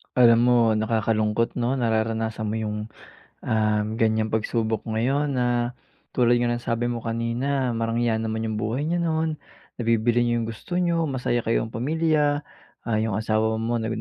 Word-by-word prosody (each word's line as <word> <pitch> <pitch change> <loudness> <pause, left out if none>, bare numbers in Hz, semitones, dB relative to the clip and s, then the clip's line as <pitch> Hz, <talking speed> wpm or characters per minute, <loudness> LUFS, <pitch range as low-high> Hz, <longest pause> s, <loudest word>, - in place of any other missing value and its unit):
Alam 115 -2 +6
mo, 125 0 +4 0.2
nakakalungkot 110 0 0
'no, 125 +2 0
nararanasan 110 -1 0
mo 110 +1 -2
yung, 105 -1 -3 0.7
um, 105 -1 +2
ganyang 110 -1 +1
pagsubok 110 0 -1
ngayon 135 +6 0
na 120 -1 0 0.4
tulad 120 -1 +3
nga 120 0 +1
ng 120 - -1
sabi 120 +1 0
mo 120 - -3
kanina 120 +3 -1
marangya 115 0 0
naman 110 0 -2
yung 110 -1 -2
buhay 115 +6 -1
niyo 170 +3 0
noon, 160 -2 -1 0.4
nabibili 115 +1 +2
niyo 120 -1 +1
yung - - -4
gusto 115 - -7
niyo, 170 -2 +1
masaya 125 -3 -1
kayong 115 -1 -1
pamilya, 150 +2 +1 0.4
ah, 110 -2 0
yung 110 -2 -1
asawa 110 0 +1
mo 115 +1 -1
rin 110 - -2
115 Hz, 160 wpm, -24 LUFS, 110-125 Hz, 0.7 s, Alam